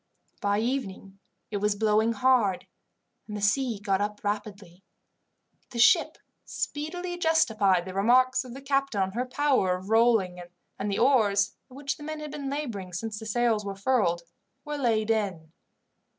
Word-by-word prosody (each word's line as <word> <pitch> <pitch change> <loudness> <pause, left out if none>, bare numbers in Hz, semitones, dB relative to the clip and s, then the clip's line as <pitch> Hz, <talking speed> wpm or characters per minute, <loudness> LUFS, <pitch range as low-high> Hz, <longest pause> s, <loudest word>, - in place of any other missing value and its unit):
By 205 0 +1
evening 200 -6 -4 0.3
it 205 - -1
was 205 0 +1
blowing 220 +2 +2
hard, 230 -5 +2 0.6
and 210 -1 -5
the - - -5
sea 225 +2 +1
got 200 -1 0
up 210 0 -3
rapidly. 205 -3 -5 0.9
The 240 - -8
ship 235 - +4 0.3
speedily 350 +4 -4
justified 220 - +2
the 185 - -7
remarks 255 +6 +3
of 250 -1 -10
the 270 - -10
captain 275 -5 0
on 190 0 0
her 245 +5 -3
power 255 -10 +2
of 190 +2 -11
rolling, 225 -6 +3 0.4
and 205 +1 -2
the 195 - -1
oars, 210 -6 +3
at 255 - -15
which 275 0 -3
the 295 - -11
men 310 0 -5
had 300 -1 -7
been 285 -2 -5
labouring 230 -11 -4
since 210 +4 -4
the 220 - -8
sails 225 -1 +1
were 200 -1 -5
furled, 195 -5 +1 0.4
were 295 0 -4
laid 225 -4 +1
in. 190 -8 -2
220 Hz, 165 wpm, -27 LUFS, 200-260 Hz, 0.9 s, ship